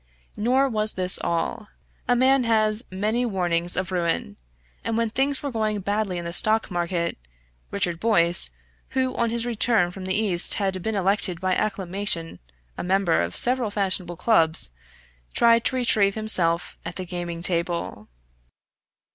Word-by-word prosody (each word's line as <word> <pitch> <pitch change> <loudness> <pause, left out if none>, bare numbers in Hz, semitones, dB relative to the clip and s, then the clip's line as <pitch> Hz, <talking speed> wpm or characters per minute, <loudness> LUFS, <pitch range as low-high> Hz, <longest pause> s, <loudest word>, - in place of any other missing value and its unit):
Nor 255 +6 +1
was 215 -3 -1
this 185 -1 +4
all. 170 +6 -2 0.4
A 245 - +3
man 260 +1 +3
has 220 0 +1
many 215 +6 -1
warnings 175 -6 -1
of 185 0 -3
ruin, 170 - -2 0.5
and 225 - -2
when 230 -1 -1
things 270 +4 0
were 285 - -3
going 215 -3 -2
badly 205 -1 -2
in 175 - -5
the 170 - -4
stock 215 +3 +2
market, 175 - -2 0.5
Richard 175 -4 -2
Boyce, 175 - +2 0.5
who 260 -1 0
on 235 -1 0
his 235 0 -1
return 225 -5 +1
from 185 0 -9
the 185 0 -1
East 200 -5 +4
had 190 -2 -1
been 220 +3 -3
elected 195 -2 0
by 185 0 -1
acclamation 190 - -2 0.4
a - - -3
member 185 - +1
of 85 +1 -4
several 250 -2 +2
fashionable 190 -4 +2
clubs, 160 - +1 0.6
tried 230 0 +4
to - - +1
retrieve 215 -5 +3
himself 175 -6 +1
at 165 +1 -7
the 185 - -5
gaming 175 -1 -6
table. 170 - 0
195 Hz, 155 wpm, -23 LUFS, 175-225 Hz, 0.6 s, this